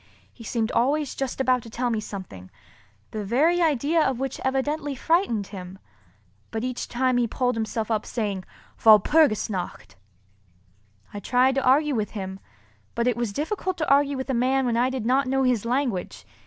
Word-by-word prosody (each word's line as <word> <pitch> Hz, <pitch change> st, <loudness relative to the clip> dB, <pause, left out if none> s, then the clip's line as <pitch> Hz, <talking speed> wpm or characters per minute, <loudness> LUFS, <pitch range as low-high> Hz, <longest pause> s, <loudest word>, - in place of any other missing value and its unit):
He 235 Hz, -, -13 dB
seemed 225 Hz, 0 st, -1 dB
always 285 Hz, +3 st, +1 dB
just 270 Hz, -1 st, -4 dB
about 255 Hz, -1 st, +2 dB
to 230 Hz, -, -12 dB
tell 240 Hz, +2 st, -2 dB
me 225 Hz, -, 0 dB
something—the 105 Hz, -, -10 dB
very 305 Hz, -, +2 dB
idea 315 Hz, +1 st, +2 dB
of 265 Hz, -5 st, +1 dB
which 270 Hz, -1 st, -3 dB
evidently 285 Hz, +2 st, -1 dB
frightened 290 Hz, -, +1 dB
him; 185 Hz, -1 st, -8 dB, 0.7 s
but 220 Hz, +1 st, -4 dB
each 255 Hz, -1 st, -3 dB
time 255 Hz, 0 st, +1 dB
he 240 Hz, -1 st, +2 dB
pulled 250 Hz, +2 st, 0 dB
himself 220 Hz, 0 st, -3 dB
up 215 Hz, -1 st, 0 dB
saying, 205 Hz, -5 st, -3 dB, 0.4 s
"Walpurgis 220 Hz, +4 st, +5 dB
nacht!" 185 Hz, -, -6 dB, 1.2 s
I 205 Hz, -, -5 dB
tried 250 Hz, +5 st, +2 dB
to 270 Hz, 0 st, 0 dB
argue 290 Hz, +3 st, +3 dB
with 215 Hz, -2 st, -3 dB
him, 190 Hz, -1 st, -5 dB, 0.6 s
but 235 Hz, -, 0 dB
it 245 Hz, -2 st, +2 dB
was 235 Hz, -2 st, -2 dB
difficult 365 Hz, -, -3 dB
to 310 Hz, -, -2 dB
argue 280 Hz, 0 st, +3 dB
with 260 Hz, +1 st, -3 dB
a -, -, 0 dB
man 260 Hz, +2 st, +2 dB
when 240 Hz, -2 st, 0 dB
I 245 Hz, +2 st, +2 dB
did 260 Hz, -4 st, -4 dB
not 260 Hz, +3 st, +2 dB
know 270 Hz, +1 st, +1 dB
his 245 Hz, -4 st, +1 dB
language. 245 Hz, -6 st, -2 dB
250 Hz, 175 wpm, -25 LUFS, 215-270 Hz, 1.2 s, Walpurgis